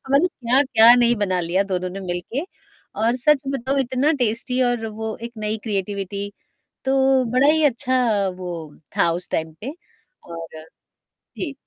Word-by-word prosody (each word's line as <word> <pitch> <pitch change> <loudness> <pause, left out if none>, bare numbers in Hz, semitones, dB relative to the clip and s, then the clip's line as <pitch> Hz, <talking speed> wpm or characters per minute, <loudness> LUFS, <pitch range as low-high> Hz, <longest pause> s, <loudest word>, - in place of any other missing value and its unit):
मतलब 295 +7 +4
क्या-क्या 245 -4 +5
नहीं 240 -1 +4
बना 185 -3 0
लिया 175 +3 +1
दोनों 180 0 -1
ने 195 +2 -6
मिलके 185 - -4 0.6
और 235 +3 +2
सच 280 +2 +3
बताऊँ 270 +1 0
इतना 265 +4 +1
टेस्टी 240 +3 -1
और 245 -2 0
वो 220 0 -5
एक 235 - -6
नई 215 +1 -2
क्रिएटिविटी, 200 -1 -3 0.5
तो 265 -1 +3
बड़ा 260 +3 +5
ही 315 -1 +2
अच्छा 240 -6 +2
वो 180 -2 -5 0.4
था 170 - +3
उस 175 +2 -5
टाइम 160 0 -2
पे 270 +6 -4 0.6
और 165 -1 -8 0.8
जी। 290 -5 -3
230 Hz, 150 wpm, -22 LUFS, 195-260 Hz, 0.8 s, क्या-क्या